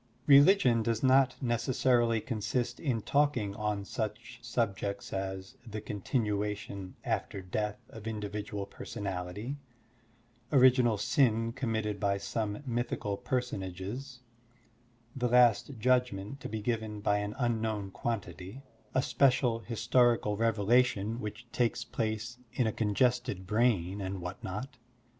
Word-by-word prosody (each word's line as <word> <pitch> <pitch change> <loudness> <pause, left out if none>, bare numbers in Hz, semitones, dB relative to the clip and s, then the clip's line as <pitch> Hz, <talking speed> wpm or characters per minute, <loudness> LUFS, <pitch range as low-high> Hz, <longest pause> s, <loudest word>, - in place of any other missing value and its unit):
Religion 140 - +6
does 115 +1 -1
not 130 0 +5
necessarily 120 -1 +2
consist 115 +2 -2
in 125 -8 -1
talking 140 -9 +1
on 105 -2 -2
such - - -5
subjects 100 -3 -2
as 95 +5 -4
the 110 -3 -6
continuation 105 -2 -2
after 100 - -2
death 105 +3 -2
of 110 -1 -9
individual 105 -1 -4
personality, 100 +4 -5 0.9
original 125 -5 +5
sin 115 +1 +2
com 130 -3 -2
mitted 105 -2 -1
by 100 -1 +1
some 105 +3 -3
mythical 120 -4 -2
personages, 120 +2 -4 0.9
the 125 -2 0
last 125 +2 +4
judgment 125 -1 +1
to - - -6
be 110 0 -4
given 110 -2 -2
by 105 0 +2
an 105 +1 -4
unknown 110 -5 -1
quantity, 100 +2 -5 0.3
a 130 - +3
special 125 -5 +3
historical 115 -1 +2
revelation 115 0 +2
which 120 +1 -6
takes 120 -1 0
place 115 +2 -3
in 125 - +1
a 110 - 0
congested 110 -2 +1
brain, 105 -3 +1
and 95 0 -3
what 90 +1 -7
not. 125 +8 -5
110 Hz, 120 wpm, -31 LUFS, 100-125 Hz, 0.9 s, Religion